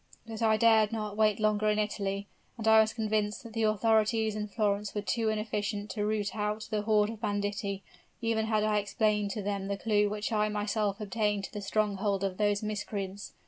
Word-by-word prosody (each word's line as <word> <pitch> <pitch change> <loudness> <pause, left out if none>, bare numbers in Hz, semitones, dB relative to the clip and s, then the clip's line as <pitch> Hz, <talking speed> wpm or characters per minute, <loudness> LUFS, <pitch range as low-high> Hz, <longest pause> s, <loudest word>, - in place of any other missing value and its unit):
But 225 0 -7
I 220 -1 +4
dare 220 -2 +5
not 215 -2 -3
wait 215 -1 +3
longer 215 0 +2
in 210 - +2
Italy; 200 -2 -2 0.3
and 220 -1 -3
I 220 0 +8
was 220 0 +1
convinced 215 -1 -1
that 230 -2 -10
the 225 - -1
authorities 220 0 +2
in 210 0 -3
Florence 205 -1 -1
were 205 - -2
too 220 +3 0
inefficient 210 -1 -2
to 210 - -2
root 210 -1 -1
out 210 0 -2
the 210 -1 0
horde 210 0 +2
of 220 -2 -10
banditti, 205 -1 -2 0.4
even 225 -1 0
had 215 -1 +1
I 215 -1 +2
explained 210 0 0
to 210 - -4
them 200 -1 -2
the 200 0 -2
clew 210 0 +2
which 210 +2 -3
I 215 -1 +2
myself 210 0 -1
obtained 210 -1 -1
to - - -7
the 205 - -4
stronghold 200 -1 0
of 190 -2 -2
those 205 0 +1
miscreants. 205 -2 -4
210 Hz, 200 wpm, -30 LUFS, 205-220 Hz, 0.4 s, I